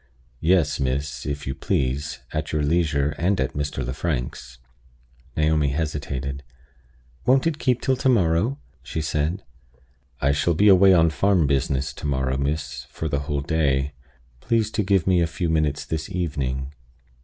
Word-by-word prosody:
"Yes, 80 -2 +2
miss, 65 0 -2
if 70 -1 -3
you 65 - -2
please, 70 +2 -2
at 75 0 -2
your 75 -1 0
leisure 75 -2 +1
and 90 +3 +1
at 65 - -1
Mr. 70 -3 -3
Lefrank's." 65 -3 -4 0.8
Naomi 75 -1 +2
hesitated. 70 -2 -3 0.9
"Won't 130 +3 +4
it 160 -2 0
keep 125 -2 +1
till 130 - +2
to 130 - +1
morrow?" 100 +3 +2 0.2
she - - -5
said. 80 +4 -1 0.8
"I 70 - +2
shall 75 +4 +1
be 105 +5 +5
away 95 0 +7
on 85 -3 +5
farm 95 0 +2
business 70 -1 0
to 75 - -5
morrow, 65 -2 0
miss, 70 -3 -3
for 80 - -4
the 70 -2 0
whole 70 0 -2
day. 70 -2 0 0.5
Please 110 - 0
to 110 - 0
give 95 -3 +2
me 90 -2 +3
a 85 - +2
few 80 +1 -2
minutes 75 -3 0
this 80 -1 -4
evening." 70 -6 -2
75 Hz, 155 wpm, -24 LUFS, 70-85 Hz, 0.9 s, away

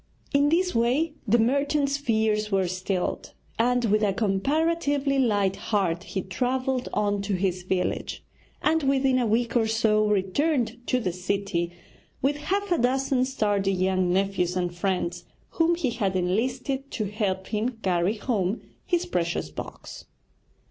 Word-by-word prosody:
In 285 +1 +4
this 360 +3 +2
way 255 +8 +1
the 225 +4 +5
merchant's 280 +4 +2
fears 220 -5 0
were 190 -2 +2
stilled, 185 0 -3 0.3
and, 245 +1 +2
with 215 0 +2
a 205 -2 +2
comparatively 280 - +1
light 205 -6 +2
heart, 190 -5 -1
he 190 - -3
travelled 255 +5 -1
on 205 -1 0
to 200 0 -1
his 185 -1 -1
village; 180 0 -2 0.4
and 320 +1 +3
within 270 -2 +2
a 240 - +1
week 230 +3 +1
or 225 -2 +3
so 220 -1 +2
returned 230 - +1
to 255 - +2
the 185 -7 -2
city 180 -1 -2 0.5
with 285 +2 +1
half 395 +6 -2
a 345 - +3
dozen 260 +1 +2
sturdy 205 -6 0
young 185 -1 +1
nephews 185 -1 +1
and 175 -1 -1
friends 175 -1 -2 0.2
whom 335 +1 +2
he 305 -8 -1
had 200 -5 -1
enlisted 250 +9 -1
to 215 - -2
help 195 -2 -2
him 225 +2 -1
carry 180 +2 +1
home 210 -3 -1 0.3
his 350 -2 +1
precious 170 - -2
box. - - -8
220 Hz, 150 wpm, -26 LUFS, 190-265 Hz, 0.5 s, the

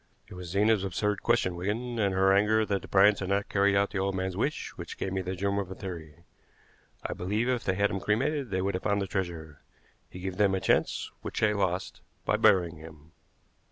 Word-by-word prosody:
It - - -10
was 90 -1 -8
Zena's 105 +2 +2
absurd 105 +1 -1
question, 115 -7 +1
Wigan, 115 +7 -3
and 100 -3 +1
her 95 +1 +4
anger 110 +2 +3
that 100 -2 -1
the - - -10
Bryants 100 +1 +5
had 95 - -4
not 100 +1 0
carried 100 0 +3
out 100 0 +2
the 100 - -2
old 95 0 -1
man's 95 -1 -2
wish, 140 +10 -2
which - - -8
gave 95 - -3
me 95 - -1
the 95 +1 -4
germ 100 +2 0
of 95 -2 -4
a 95 - -7
theory. 85 -4 -8 0.8
I - - -2
believe 105 +6 -1
if 125 -2 0
they 95 - 0
had 100 - -3
had 100 - +3
him 95 - -2
cremated 130 +7 0
they 95 -1 -1
would 100 +1 0
have 90 - -2
found 100 0 +1
the 100 - -1
treasure. 85 -6 -4 0.5
He 90 - -10
gave 95 -1 -4
them 100 -2 +3
a - - 0
chance - - +1
which - - -4
they 105 -1 +3
lost 95 -3 -2 0.2
by - - +2
burying 85 -4 +3
him." 80 0 -13
95 Hz, 230 wpm, -28 LUFS, 90-105 Hz, 0.8 s, Bryants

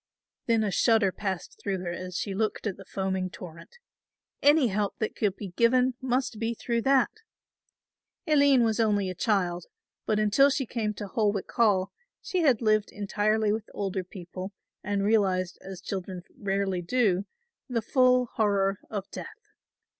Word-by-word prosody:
Then 230 -2 +3
a 205 - 0
shudder 225 -2 +3
passed 190 -2 -5
through 195 -2 -1
her 175 -1 -3
as 180 +1 -5
she 200 - -3
looked 215 +3 -2
at 200 -4 -1
the 195 - -13
foaming 190 -1 -2
torrent. 170 - -11 0.6
Any 290 -3 +5
help 205 0 -1
that 215 -2 -2
could 205 -3 0
be 200 -2 -7
given 250 +6 +3
must 255 -3 -1
be 230 +1 -1
through 235 0 -1
that. 270 0 +3 1.1
Aline 285 -5 +5
was 225 0 +1
only 205 -4 +2
a - - -5
child; 180 -3 0 0.4
but 215 - +2
until 215 +7 +4
she 275 -1 -1
came 215 -3 -2
to 205 - -6
Holwick 205 -1 -1
Hall 205 -5 +2 0.3
she 370 - -2
had 260 -8 +3
lived 215 -1 +2
entirely 210 +1 0
with 220 0 -3
older 195 -2 -2
people 185 +1 -8 0.3
and 200 -1 -1
realised 190 -4 +1
as 190 -2 -8
children 185 -2 -5
rarely 195 -2 -1
do 195 -1 +1 0.4
the 230 -3 -1
full 255 0 +4
horror 200 -3 +1
of 200 -3 -4
death. 450 +2 -10
210 Hz, 160 wpm, -27 LUFS, 190-235 Hz, 1.1 s, Any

